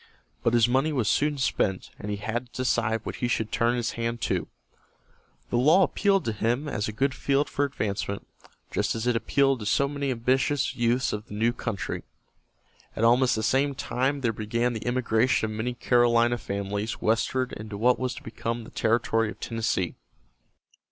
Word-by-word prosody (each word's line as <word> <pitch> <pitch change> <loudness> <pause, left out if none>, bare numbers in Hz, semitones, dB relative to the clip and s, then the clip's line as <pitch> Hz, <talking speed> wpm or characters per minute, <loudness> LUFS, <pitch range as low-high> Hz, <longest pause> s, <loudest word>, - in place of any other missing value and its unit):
But 115 - +2
his 120 -1 +5
money 135 +5 +2
was 125 -8 0
soon 145 +5 +2
spent, 100 -7 0
and 105 - -6
he 105 - -2
had 115 +4 -3
to 130 - -2
decide 115 -3 +1
what - - -5
he 120 - -1
should 110 -2 -1
turn 120 +1 +2
his 120 -1 -1
hand 115 0 -3
to. - - -1 1.0
The 120 - +2
law 155 +9 +6
appealed 195 +1 +2
to 115 - 0
him 120 +7 0
as 105 -7 -2
a - - -3
good 135 +6 0
field 140 +2 +1
for 145 - 0
advancement, 100 -7 -3 0.5
just - - 0
as 110 +1 -3
it 125 -1 +2
appealed 135 +3 +2
to 105 - -5
so 140 +6 +3
many 140 -1 -3
ambitious 130 +3 +1
youths 120 +2 +1
of 105 +2 -5
the 105 - -8
new 115 +3 +2
country. 115 -5 -4 0.9
At 110 - -2
almost 125 +2 +4
the 110 - -2
same 135 +5 +2
time 135 +3 -1
there 115 -3 +1
began 115 +3 -1
the 110 +1 -5
emigration 120 -2 +1
of - - -5
many 120 +3 -2
Carolina 120 -1 +3
families 100 +2 -3
westward 125 +3 0
into 105 -1 -7
what 125 +4 +3
was 130 -1 -2
to - - -10
become 115 +1 -4
the - - -12
territory 115 -1 +1
of - - -9
Tennessee. 110 -6 -1
120 Hz, 185 wpm, -26 LUFS, 110-130 Hz, 1.0 s, law